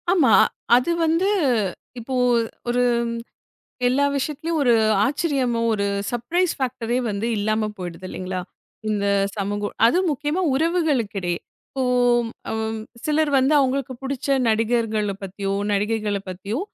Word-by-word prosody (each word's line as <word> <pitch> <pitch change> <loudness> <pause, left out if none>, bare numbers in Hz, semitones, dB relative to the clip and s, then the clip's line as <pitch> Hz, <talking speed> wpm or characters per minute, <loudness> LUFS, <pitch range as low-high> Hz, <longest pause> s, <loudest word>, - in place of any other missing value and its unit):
ஆமா. 360 -3 +4 0.4
அது 250 +7 +2
வந்து 330 +4 +2 0.7
இப்போ 235 +3 -6 0.6
ஒரு 245 +1 +2 1.0
எல்லா 270 +3 +3
விஷயத்துலயும் 305 +4 -2
ஒரு 245 -3 +4 0.3
ஆச்சரியமோ 270 -5 0
ஒரு 200 -1 0 0.3
சப்ரைஸ் 330 +10 0
ஃபேக்ட்டரே 250 -3 -1
வந்து 205 +2 -2
இல்லாம 215 +1 0
போயிடுது 180 0 -7
இல்லீங்களா? 185 0 -4 0.5
இந்த 205 -1 0 0.3
சமூக 205 +1 -2 0.2
அதுவும் 350 +9 +3
முக்கியமா 295 +5 -1
உறவுகளுக்ககிடையே. 260 - 0 0.3
இப்போ 265 - -2 0.7
அம் 220 0 -2 0.3
சிலர் 305 0 +1
வந்து 265 +3 +3
அவங்களுக்கு 265 -1 0
புடிச்ச 275 0 0
நடிகர்களப் 220 -3 0
பத்தியோ, 195 +1 -4 0.2
நடிகைகள 210 0 0
பத்தியோ 200 +7 -4
240 Hz, 110 wpm, -22 LUFS, 210-285 Hz, 1.0 s, ஆமா